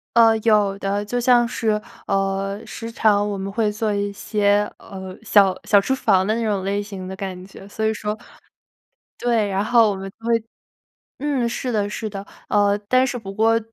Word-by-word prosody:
呃， 225 -1 +6
有 210 -3 +3
的， 200 +1 -1
就 245 +4 -2
像 240 -1 +4
是， 220 -3 0 0.3
呃， 195 0 -1
时 230 +1 -7
常 210 -2 +2
我 200 - -3
们 195 +1 -4
会 215 0 +1
做 210 0 -1
一 200 0 -1
些， 205 0 +1
呃， 190 -1 -9
小 200 -4 +4
小 205 -2 +5
厨 265 +7 0
房 195 -7 +2
的 215 - +1
那 230 - -1
种 205 -3 0
类 200 +1 -1
型 195 -3 -7
的 190 - -6
感 185 -2 -6
觉， 195 0 -13
所 220 +1 -3
以 220 - +2
说 210 0 -4 1.0
对， 230 -4 +1
然 195 +1 0
后 230 -1 +4
我 - - -3
们 195 0 -6
就 225 +4 -17
会 230 -1 +2 0.8
嗯， 275 -5 0
是 250 +2 -3
的 205 -3 0
是 215 0 -4
的， 195 0 -6 0.2
呃， 205 -1 +3
但 255 +1 +4
是 245 - -3
不 195 -4 -7
过 225 +2 +3
210 Hz, 210 characters per minute, -22 LUFS, 195-225 Hz, 1.0 s, 呃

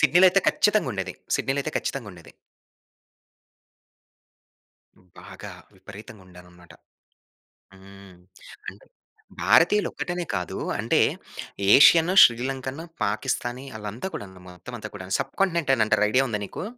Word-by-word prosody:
సిడ్నీ‌లో 170 +6 +5
అయితే 195 - +2
ఖచ్చితంగా 210 -10 +1
ఉండేది. 95 -2 -5 0.2
సిడ్నీ‌లో 135 +1 -2
అయితే 155 - -5
ఖచ్చితంగా 120 -7 -5
ఉండేది. 85 -2 -15 2.9
బాగా - - -11 0.2
విపరీతంగా 105 -1 -13
ఉండారనమాట. 90 -1 -17 1.0
హ్మ్. 95 -1 -16 0.5
అంటే - - -10 0.6
భారతీయులు 210 0 +4
ఒక్కటనే 175 -1 -4
కాదు 90 -3 -4 0.2
అంటే - - +1 0.8
ఏషియన్, 165 +5 +6
శ్రీలంకన్, 130 +4 0 0.2
పాకిస్తానీ 120 +5 -3
ఆళ్ళంతా 105 - -6
కూడాను 95 -2 -9
మొత్తం 90 +7 -11
అంతా 110 -1 -8
కూడాను, 95 -1 -7
సబ్‌కాంటినెంట్ 170 -7 -1
అని 110 - +2
అంటారు 105 0 +2
ఐడియా 130 +3 +3
ఉందా 105 -3 -3
నీకు? 100 - -8
115 Hz, 110 wpm, -24 LUFS, 95-145 Hz, 2.9 s, ఏషియన్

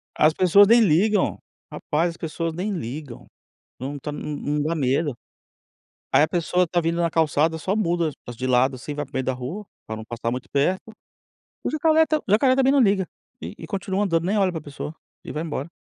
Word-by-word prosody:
As 155 +1 +4
pessoas 195 +3 +6
nem 235 +2 +6
ligam, 200 +3 +3 0.3
rapaz 165 +3 -1
as 165 - -13
pessoas 165 0 -3
nem 190 +5 -3
ligam, 140 - -6 0.5
não 140 +3 -5
tá, 150 - -5
não 150 0 -5
não 145 +1 -1
dá 160 +3 0
medo, 140 -1 0 1.0
aí - - +6
a - - +3
pessoa 175 +2 +1
está 175 +1 0
vindo 170 +1 0
na 170 - +2
calçada 160 0 +2
só 190 +5 -1
muda 170 -6 +1 0.2
as 120 - -7
de 130 +2 -3
lado 130 +1 +3
assim, 130 +4 -6
vai 145 0 -3
para - - -25
o - - -12
meio 130 - 0
da 130 - 0
rua, 135 +12 -6 0.2
para 110 - -5
não 110 - -8
passar 115 0 -3
muito 125 +1 -5
perto, 180 +10 0 0.7
o - - 0
jacaré 315 +1 +3
está 310 -1 +1
o - - -15
jacaré 255 +5 +5
também 270 0 +4
não 280 - +4
liga, 195 -5 +3 0.3
e 85 +4 -7
e 165 - -8
continua 195 +2 -1
andando, 165 -4 +1
nem 200 +4 +1
olha 190 -2 +2
para 160 - -4
pessoa, 145 +1 -7 0.3
e - - -6
vai 155 - -3
embora. 155 -1 -4
165 Hz, 220 wpm, -23 LUFS, 145-190 Hz, 1.0 s, pessoas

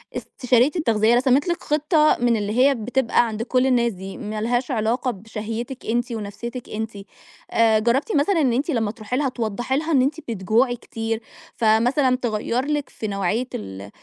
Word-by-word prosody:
استشارية 250 +2 +1
التغذية 230 -8 +3
رسمِت 260 +4 +3
لِك 345 0 -1
خطة 305 +1 +3
من 240 -1 +3
اللي 205 0 -2
هي 275 +2 +5
بتبقى 240 +1 +1
عند 220 0 -3
كل 255 +1 +2
الناس 235 -2 +2
دي 190 +1 -8
ما 215 -3 -5
لهاش 245 +4 0
علاقة 240 +2 0
بشهيتِك 225 +4 -6
أنتِ 240 +2 -1
ونفسيتِك 230 +3 -6
أنتِ، 220 +1 -4 0.6
آآ 220 -1 +4
جربتِ 255 - +1
مثلًا 315 +4 +2
إن 255 -4 +2
أنتِ 270 +7 -1
لما 225 -6 0
تروحي 225 +2 -4
لها 280 -2 +1
توضحي 240 +2 -2
لها 320 +3 -2
إن 270 - +4
أنتِ 285 +5 0
بتجوعي 230 +5 +1
كتير، 225 -1 -4 0.3
فمثلًا 245 +4 +3
تغيّر 240 +1 -1
لِك 295 -1 -2
في 220 - -6
نوعية 200 +5 -1
ال 95 0 -7
240 Hz, 170 wpm, -22 LUFS, 220-265 Hz, 0.6 s, هي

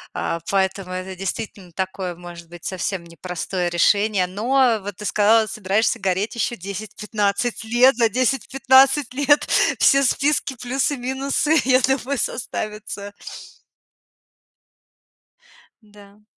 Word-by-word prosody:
Э, 165 - -2
поэтому 190 -1 -1
это 185 +1 -5
действительно 195 -1 -6
такое, 190 0 -4
может 170 -1 -11
быть, 175 -1 -12
совсем 185 -1 -3
не 170 0 -15
простое 180 0 -3
решение. 200 +2 +2
Но, 235 +4 +2
вот 200 -2 -7
ты 210 - -8
сказала, 215 +3 +3
собираешься 210 +1 0
гореть 195 +3 -1
ещё 235 +1 -1
10-15 210 +3 -3
лет. 240 +4 +4
За 230 -2 +3
10-15 265 +3 +3
лет 285 +2 +2 0.3
все 275 0 +5
списки, 275 +1 0
плюсы, 265 +3 -1
минусы, 270 +4 0
я 255 0 +4
думаю, 265 +1 0
составятся. 210 -3 -5 2.7
Да. 205 0 -18
210 Hz, 115 wpm, -21 LUFS, 190-255 Hz, 2.7 s, все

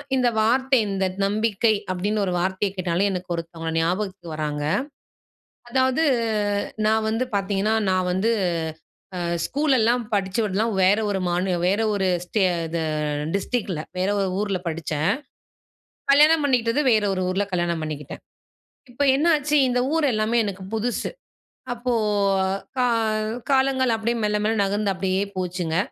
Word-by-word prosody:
இந்த 250 -1 +2
வார்த்தை 260 +4 +3
இந்த 195 -1 0 0.2
"நம்பிக்கை" 215 +1 +1 0.2
அப்படீன்னு 205 +3 -1
ஒரு 180 - -2
வார்த்தைய 190 +2 -1
கேட்டாலே, 185 +2 +1
எனக்கு 180 -1 -4
ஒருத்தவங்க 165 -1 -5
ஞாபகத்துக்கு 180 0 -2
வராங்க. 150 -1 -3 1.1
அதாவது 260 +4 +2 0.8
நான் 220 0 +2
வந்து 225 +3 0
பார்த்தீங்கன்னா, 200 +2 0 0.2
நான் 185 -1 +1
வந்து 210 +5 +1 0.9
அ - - -3 0.3
ஸ்கூலல்லாம் 250 -4 +2
படிச்சு 195 +2 0
விடலாம் 215 +3 0
வேற 195 +3 +5
ஒரு 195 - -1
மாநி 180 +2 0 0.2
வேற 200 +4 +2
ஒரு 190 -2 0 0.2
ஸ்டே 205 +4 -1 0.3
இது 165 0 -3 0.5
டிஸ்ட்ரிக்ட்ல. 200 -6 -2 0.2
வேற 185 +1 0
ஒரு 195 -1 0
ஊர்ல 205 -2 0
படிச்சேன். 155 -1 -1 1.0
கல்யாணம் 305 +3 +6
பண்ணிக்கிட்டது 250 +1 +2
வேற 215 -2 +3
ஒரு 185 - -2
ஊர்ல, 195 +2 0
கல்யாணம் 170 -2 -1
பண்ணிக்கிட்டேன். 150 -2 -6 0.7
இப்ப 285 +4 -1
என்னாச்சு, 300 -1 +2
இந்த 250 0 +1 0.2
ஊர் 320 - +2
எல்லாமே 215 +2 +1
எனக்கு 195 -1 -5
புதுசு. 235 +2 -1 0.6
அப்போ 245 +1 -2 0.9
கா 250 - +3 0.7
காலங்கள் 265 -2 +3
அப்படீயே 230 +2 -1
மெல்ல 210 0 +1
மெல்ல 220 +1 +1
நகர்ந்து 200 0 0
அப்படீயே 190 +1 0
போச்சுங்க. 180 -3 -2
205 Hz, 130 wpm, -23 LUFS, 185-235 Hz, 1.1 s, கல்யாணம்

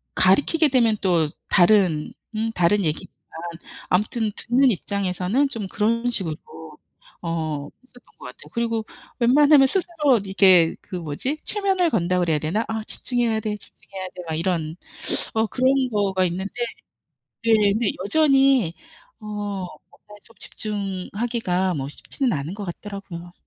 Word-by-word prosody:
가르키게 290 - +4
되면 235 -5 +3
또 175 -5 +2 0.2
다른 180 -5 +3 0.2
음 225 +1 -1
다른 185 +3 +2
얘기지만 155 0 -3 0.8
아무튼 210 +3 +1
듣는 255 +3 +3
입장에서는 200 +6 -1
좀 220 -7 -4
그런 230 +5 0
식으로 175 -9 -2 0.9
어 155 -4 -3
했었던 250 -1 -19 0.2
것 - - -11
같아요. - - -11
그리고 230 -2 -1 0.3
웬만하면 280 +3 +6
스스로 305 - +2
이게 190 -4 +5
그 190 - -8
뭐지? 175 - -3
최면을 385 -4 +1
건다 180 - +1
그래야 165 -3 +2
되나? 175 +10 -1
'아 220 0 -3
집중해야 235 -1 -1
돼, 210 -1 -2
집중해야 190 -2 -9
돼.' 180 - -8
막 160 - -2
이런 165 -2 -1 0.6
어 220 0 +2
그런 260 +3 +2
거가 195 -3 +1
있는데 185 +3 -4 0.9
네 230 -1 +4 0.2
근데 220 0 +1
여전히 270 - +4 0.5
어 215 - -13
뭔가 205 0 -7
좀 230 - -15
집중하기가 200 -2 -2
뭐 135 -2 -3
쉽지는 250 - -2
않은 145 +3 -3
것 205 -1 -6
같더라고요. 175 -2 -8
205 Hz, 290 characters per minute, -23 LUFS, 180-240 Hz, 0.9 s, 웬만하면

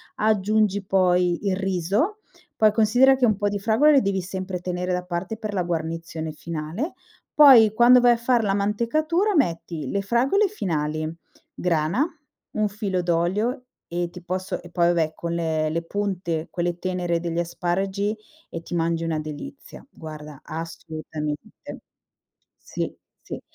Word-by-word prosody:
aggiungi 210 -1 +1
poi 180 -1 +2
il 190 - +2
riso, 195 - 0 0.4
poi 215 -1 +4
considera 245 +5 +5
che 255 -2 +3
un 215 -3 +2
po' 205 0 0
di 205 0 -1
fragole 225 +9 +4
le 280 -2 +5
devi 195 -3 0
sempre 185 0 -4
tenere 180 0 -3
da 180 0 -1
parte 180 +4 -4
per 215 -1 -5
la 185 - 0
guarnizione 165 -1 -3
finale, 165 - -5 0.4
poi 250 -8 +8
quando 240 +2 +7
vai 245 0 +6
a - - -1
fare 235 0 +2
la 200 -2 +1
mantecatura 310 - +1
metti 170 - -1
le 200 - 0
fragole 255 - +2
finali, 155 - -2 0.5
grana, 170 - +1 0.5
un 215 -1 +1
filo 195 -3 -2
d'olio 195 +10 0 0.2
e 175 0 -2
ti 180 0 -12
posso 185 +2 -3
e 175 - -12
poi 170 -1 +2
vabbè 165 -2 +1
con 170 +1 -4
le 160 -2 0
le 165 +2 -2
punte 175 -4 -2
quelle 175 0 -2
tenere 180 -2 -1
degli 170 0 -3
asparagi 190 +4 -1 0.3
e 165 - -6
ti 175 - -8
mangi 165 0 0
una 165 -2 -1
delizia. 155 - -9
Guarda 150 -3 -10
assolutamente 155 -2 -6 1.1
sì, - - -5 0.3
sì. - - -7
185 Hz, 150 wpm, -24 LUFS, 170-215 Hz, 1.1 s, poi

